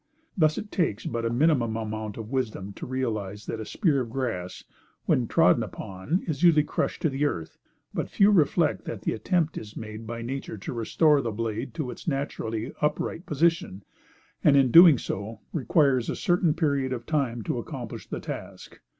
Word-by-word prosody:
Thus, 155 -4 +3
it 210 - -6
takes 115 - -1
but 115 0 -2
a - - 0
minimum 120 -3 +2
amount 110 -1 -4
of 115 0 -7
wisdom 110 -7 -2
to - - -8
realize 110 -6 -3
that 115 - -4
a 110 - -5
spear 150 - +1
of 120 - -5
grass, 110 -8 -4 0.4
when - - +2
trodden - - +4
upon, 95 - -3
is 155 -5 -3
usually 165 -4 +6
crushed - - -2
to 160 - +3
the 135 +2 -1
earth; 85 - -3 0.3
but, - - -2
few 200 +1 +4
reflect 165 -3 +2
that 110 - -6
the - - 0
attempt 165 - 0
is 105 -1 -11
made 110 0 -7
by 115 0 -5
nature 130 -2 -5
to 95 - -6
restore 145 +6 +3
the 120 - -2
blade 115 +4 -4
to 150 -7 -3
its - - -11
naturally 130 -5 -3
upright 150 +3 -1
position, 160 - +1 0.6
and 140 -2 +6
in 130 -3 +4
doing 170 -2 +9
so, 105 +1 -5
requires 135 -3 +2
a - - -1
certain 175 -3 +2
period 140 -5 0
of 120 -1 -5
time 130 -7 -1
to - - -2
accomplish - - -7
the - - -4
task. - - -8
130 Hz, 185 wpm, -26 LUFS, 110-155 Hz, 0.6 s, doing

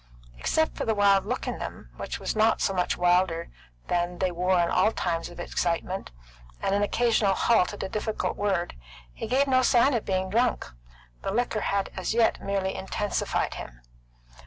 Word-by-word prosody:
Except 315 0 +1
for - - -3
the 220 - 0
wild 200 -1 +4
look 250 +3 -2
in - - -3
them, - - -7
which - - -5
was - - -3
not 220 +1 +3
so 195 - +1
much 180 -1 0
wilder 175 -1 +2 0.4
than 175 0 -1
they 185 0 0
wore 180 +1 +1
in 170 - +3
all 185 +4 +3
times 170 -5 -2
of 175 - -12
excitement, 175 +2 -2 0.5
and 195 - 0
an 200 - +2
occasional 215 -2 +2
halt 225 -5 +3
at 205 - -5
a - - -2
difficult 215 +2 -2
word, 195 -4 -1 0.4
he - - -6
gave 260 +4 +3
no 260 -2 +3
sign 255 +2 +4
of 235 - 0
being 190 -1 -1
drunk. 240 +3 +1 0.6
The - - -3
liquor 225 0 0
had 200 -1 -1
as 185 +4 -2
yet 230 -1 +3
merely 195 -1 -1
intensified 205 +2 -2
him. - - -9
195 Hz, 185 wpm, -27 LUFS, 180-225 Hz, 0.6 s, wild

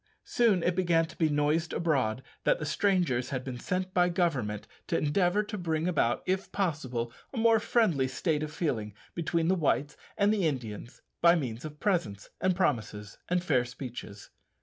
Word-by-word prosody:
Soon 215 -8 +2
it 175 - +1
began 170 -3 +3
to - - -13
be 160 -2 +2
noised 150 +3 +1
abroad 130 -8 0 0.2
that - - +3
the - - -4
strangers 175 -11 +1
had 130 -2 -3
been 125 -2 -6
sent 185 +6 -2
by 180 -1 +4
Government 135 - -1 0.2
to - - +1
endeavour 180 +6 +2
to 210 0 -6
bring 160 -1 -1
about, 135 -9 +1
if 190 +1 -1
possible, 130 -11 -2 0.2
a 265 - -7
more 225 0 +5
friendly 180 - +2
state 150 +3 -1
of 155 -1 -3
feeling 115 - -2 0.2
between 165 0 0
the 185 - +4
Whites 145 -4 +1 0.2
and 205 +1 +4
the 195 -6 +2
Indians 120 -4 -5 0.2
by 170 0 +7
means 125 -5 -3
of 150 -1 -8
presents, 115 - -1
and 185 -1 +2
promises, 110 - -1
and 180 0 +1
fair 130 -8 +2
speeches. 125 -5 -8
160 Hz, 175 wpm, -29 LUFS, 125-180 Hz, 0.2 s, by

